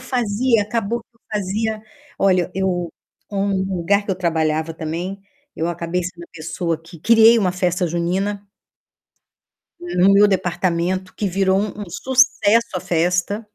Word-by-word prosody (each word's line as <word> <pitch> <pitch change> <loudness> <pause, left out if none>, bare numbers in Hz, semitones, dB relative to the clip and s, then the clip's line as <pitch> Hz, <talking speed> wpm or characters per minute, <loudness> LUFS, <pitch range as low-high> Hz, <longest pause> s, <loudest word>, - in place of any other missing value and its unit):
fazia 240 -2 +1
acabou 225 +2 -2
que - - -62
eu - - -37
fazia 215 +2 -2 0.4
Olha, 185 -3 +2
eu 180 -3 -1 0.4
um 200 0 -1 0.3
lugar 200 +4 +1
que - - -2
eu - - +1
trabalhava 160 -2 0
também, 170 +5 -5 0.3
eu 165 +2 -2
acabei 175 +1 -2
sendo 175 -1 -7
a - - -21
pessoa 165 0 -3
que 170 0 -13
criei 230 +4 +6
uma 185 -4 +1
festa 180 -1 0
junina 190 +5 -2 1.3
no 200 - +2
meu 205 +1 +6
departamento, 185 0 -1
que 205 - -2
virou 190 +1 +2
um 210 0 -4
um - - -4
sucesso 230 -3 +2
a - - -2
festa. 180 +5 0
190 Hz, 145 wpm, -20 LUFS, 175-210 Hz, 1.3 s, criei